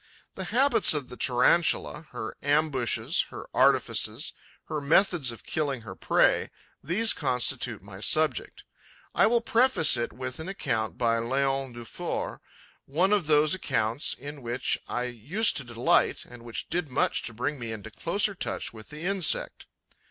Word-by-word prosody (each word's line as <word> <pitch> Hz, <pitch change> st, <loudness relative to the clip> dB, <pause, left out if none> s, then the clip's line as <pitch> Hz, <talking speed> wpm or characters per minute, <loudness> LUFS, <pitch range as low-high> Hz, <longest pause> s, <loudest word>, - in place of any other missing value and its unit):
The 190 Hz, -, -5 dB
habits 255 Hz, -, +4 dB
of 140 Hz, -4 st, -4 dB
the 125 Hz, -, -9 dB
Tarantula, 150 Hz, +5 st, +2 dB
her 110 Hz, -3 st, -6 dB
ambushes, 145 Hz, -4 st, +1 dB
her -, -, -9 dB
artifices, -, -, +2 dB, 0.3 s
her 155 Hz, -1 st, -3 dB
methods 160 Hz, -2 st, +2 dB
of 115 Hz, -, -11 dB
killing 140 Hz, -5 st, -2 dB
her 105 Hz, -4 st, -9 dB
prey: -, -, +2 dB, 0.3 s
these 200 Hz, +9 st, +3 dB
constitute 125 Hz, -, -1 dB
my 95 Hz, -1 st, -11 dB
subject. 155 Hz, +3 st, 0 dB, 0.5 s
I -, -, +4 dB
will 235 Hz, +1 st, +2 dB
preface 230 Hz, -, +3 dB
it 120 Hz, -, -2 dB
with 130 Hz, +3 st, -6 dB
an 160 Hz, +4 st, -6 dB
account 115 Hz, -, -2 dB
by 115 Hz, -1 st, +1 dB
Leon 135 Hz, +2 st, -1 dB
Dufour, 120 Hz, -2 st, -5 dB, 0.5 s
one 180 Hz, +8 st, +1 dB
of 195 Hz, -7 st, +1 dB
those 150 Hz, 0 st, +4 dB
accounts 115 Hz, -8 st, 0 dB
in 145 Hz, +1 st, -9 dB
which 120 Hz, +1 st, -1 dB
I 125 Hz, -, -2 dB
used 125 Hz, -, +1 dB
to 140 Hz, -, -3 dB
delight 120 Hz, -1 st, +1 dB
and 120 Hz, -1 st, -13 dB
which 115 Hz, -1 st, -6 dB
did 170 Hz, -3 st, -1 dB
much 125 Hz, -, +1 dB
to 115 Hz, -, -4 dB
bring 145 Hz, +5 st, -3 dB
me 115 Hz, -2 st, -5 dB
into 110 Hz, 0 st, -8 dB
closer 200 Hz, -, 0 dB
touch 185 Hz, -, -4 dB
with 110 Hz, -1 st, -12 dB
the 150 Hz, +1 st, -9 dB
insect. 190 Hz, -2 st, +1 dB
135 Hz, 155 wpm, -27 LUFS, 120-165 Hz, 0.5 s, habits